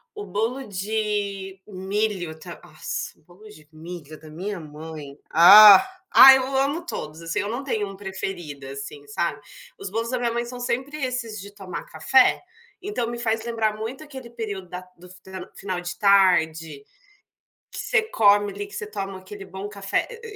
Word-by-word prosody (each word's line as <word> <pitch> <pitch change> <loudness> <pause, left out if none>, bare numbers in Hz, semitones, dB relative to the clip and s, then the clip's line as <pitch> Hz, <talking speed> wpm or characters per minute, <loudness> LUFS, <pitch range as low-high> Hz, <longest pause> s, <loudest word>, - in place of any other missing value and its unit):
o 415 -1 -6
bolo 235 +6 -2
de 200 -1 -3
milho 190 -4 -3
ta - - -10
nossa - - -6
o - - -31
bolo 185 +6 -17
de 155 -7 -16
milho 155 -1 -10
da 155 0 -14
minha 185 +5 -5
mãe, 150 -2 -10
ah, 195 +4 +10 0.3
ai 265 0 +10
eu 265 +1 -3
amo 285 +6 0
todos 155 - -6
assim, 165 +3 -3
eu 205 0 -2
não 245 +5 -4
tenho 215 -6 -2
um 195 - -10
preferido 185 -7 -6
assim 140 +1 -8
sabe, 145 0 -2 0.4
os 195 - -5
bolos 230 +2 -2
da 255 - 0
minha 240 -1 -1
mãe 235 0 -2
são 245 +1 -8
sempre 260 +4 -3
esses 240 -4 -4
de 200 +1 -11
tomar 195 -3 -8
café, 255 +11 +3 0.4
então 355 - -3
me 240 0 -5
faz 225 -1 -1
lembrar 225 -2 -1
muito 230 +7 -6
aquele 265 -5 -10
período 205 -6 -6
da 180 0 -6 0.2
do 180 +1 -15
f 185 +1 -14 0.4
final 185 -2 -4
de 180 0 -6
tarde, 165 -7 +3 0.9
que - - -7
você - - +1
come 205 - +3
ali, 205 +1 -5
que 200 - -16
você 210 - -5
toma 195 -2 -6
aquele 195 +1 -10
bom 190 +2 -7
café, 200 -1 -2 0.2
e 450 -2 -9
200 Hz, 180 wpm, -24 LUFS, 175-230 Hz, 0.9 s, ah